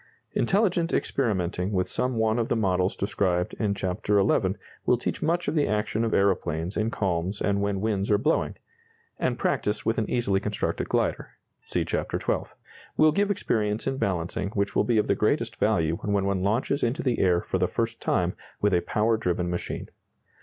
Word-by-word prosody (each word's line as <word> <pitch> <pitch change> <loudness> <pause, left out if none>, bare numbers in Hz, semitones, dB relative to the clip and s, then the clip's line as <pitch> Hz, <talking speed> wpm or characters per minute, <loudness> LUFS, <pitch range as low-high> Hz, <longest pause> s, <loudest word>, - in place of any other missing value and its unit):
Intelligent 180 -4 +2
experimenting 95 -6 0
with 90 -1 +1
some 125 0 0
one 110 +1 +2
of 115 - 0
the - - +2
models 95 -4 +1
described 90 -3 0
in 105 -3 +1
Chapter 100 +2 0
XI. 95 - +2 0.3
will - - +3
teach - - -3
much 170 +2 0
of 145 - 0
the 150 -3 +2
action 105 +1 0
of 115 - 0
aeroplanes 90 -3 +1
in 110 +1 +1
calms 95 -2 -1
and 100 -1 +1
when 100 -1 -1
winds 105 -2 0
are 105 - +5
blowing; - - 0 0.6
and - - 0
practice 105 - -1
with 115 - +1
an 110 - -2
easily 110 -6 +1
constructed 105 +1 -2
glider - - -1 0.3
(see - - 0
Chapter - - -2
XII.) - - -2 0.5
will 155 0 +6
give 200 +5 +1
experience 110 - 0
in 135 0 -1
balancing 90 -2 -1
which 100 -1 0
will - - +4
be 120 -2 +1
of 105 - +3
the - - +2
greatest - - 0
value 80 +1 +1
when 100 -2 0
one 100 -1 0
launches 115 +8 0
into 125 +8 0
the 125 -4 0
air 90 -2 +4
for - - -2
the - - +2
first - - -2
time - - +1 0.3
with 105 -1 +2
a 90 - +3
power 110 +4 +1
driven 90 -3 -1
machine. 90 - -4
105 Hz, 190 wpm, -26 LUFS, 95-115 Hz, 0.6 s, will